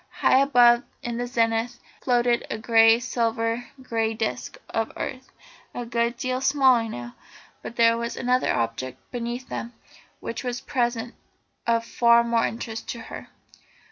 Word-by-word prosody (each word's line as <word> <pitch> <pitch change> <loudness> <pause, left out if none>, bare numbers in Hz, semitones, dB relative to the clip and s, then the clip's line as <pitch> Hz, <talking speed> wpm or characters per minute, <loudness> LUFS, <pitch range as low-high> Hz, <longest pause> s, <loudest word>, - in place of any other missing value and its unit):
High 260 - +3
above 245 -3 +5 0.2
in 235 0 -3
the 245 - -2
zenith 230 0 0 0.2
floated 240 -1 +1
the - - -3
great 225 +1 +5
silver 230 0 -1 0.2
grey 225 -2 -1
disc 220 - -3
of 225 0 -1
earth, 260 0 -5 0.5
a 245 - -4
good 235 0 -1
deal 255 +1 -2
smaller 265 -4 +3
now. 120 - -7 0.5
But 235 - -8
there 230 -1 +4
was 235 0 -4
another 250 0 +1
object 120 +3 -2
beneath 245 +1 -4
them 235 - -5 0.5
which 230 - -5
was 245 -1 -3
at - - -22
present 240 -3 -1 0.5
of 230 0 +2
far 235 0 +4
more 235 -1 +1
interest 225 -1 -6
to 235 - -4
her. - - -9
235 Hz, 150 wpm, -25 LUFS, 230-245 Hz, 0.5 s, above